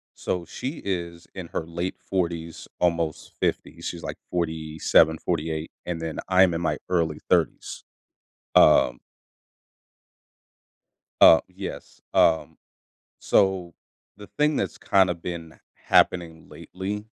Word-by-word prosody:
so, 90 -2 -3
she 135 - -6
is 85 -3 -4
in 95 -3 -7
her 80 - -4
late 85 +2 -4
40s 85 -3 -3
almost 85 -3 -1
50s, - - -2
she's - - -5
like - - -5
47, 80 -1 +2
48 80 -1 -3 0.2
and 85 -2 -3
then 80 -1 -5
I'm 95 -1 +5
in 85 - -2
my 85 - -1
early 80 -4 0
30s, - - 0 0.7
um 60 0 +5 2.2
Uh, 80 - +9
yes, 95 +1 -8
um, 80 -1 +3 0.6
so, 95 -3 +1 0.4
the 105 -1 -11
thing 150 0 +3
that's 95 - -2
kinda 95 -3 +3
been 85 -1 -7 0.2
happening 85 -2 +1
lately, 100 +3 -6
85 Hz, 110 wpm, -25 LUFS, 80-95 Hz, 2.2 s, Uh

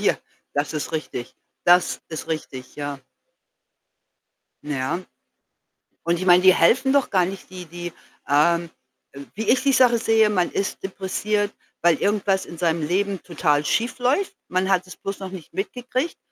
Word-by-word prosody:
hier. - - +2 0.4
Das 145 +2 -1
ist 155 +1 -4
richtig. 150 -6 -4 0.3
Das 175 +1 +4
ist 160 0 -6
richtig, 135 -5 -5
ja. 145 -1 -4 1.7
Na 150 -1 -3
ja, 130 +7 -1 1.0
und 170 0 +1
ich 185 - -3
meine, 180 0 +7
die 185 0 +7
helfen 260 +11 +4
doch 280 -2 +2
gar 185 -3 +4
nicht, 190 +1 -7
die 180 -1 -8
die, 175 +1 -7 0.3
ähm, 170 +4 +3 0.4
äh 140 - -10
wie 220 - -2
ich 255 - +4
die 275 - +3
Sache 250 -3 +5
sehe, 225 -1 +4
man 180 -3 +1
ist 195 - -2
depressiv, 200 +2 -1 0.3
weil 170 -2 +5
irgendwas 200 -1 +1
in 170 - -10
seinem 165 -1 +1
Leben 195 +2 0
total 150 -4 +1
schiefläuft. 250 - 0
Man 185 +1 0
hat 185 -1 +2
es 180 - -11
bloß 195 0 -5
noch 190 -1 -6
nicht 180 -5 -10
mitgekriegt 250 - -3
185 Hz, 160 wpm, -23 LUFS, 165-210 Hz, 1.7 s, meine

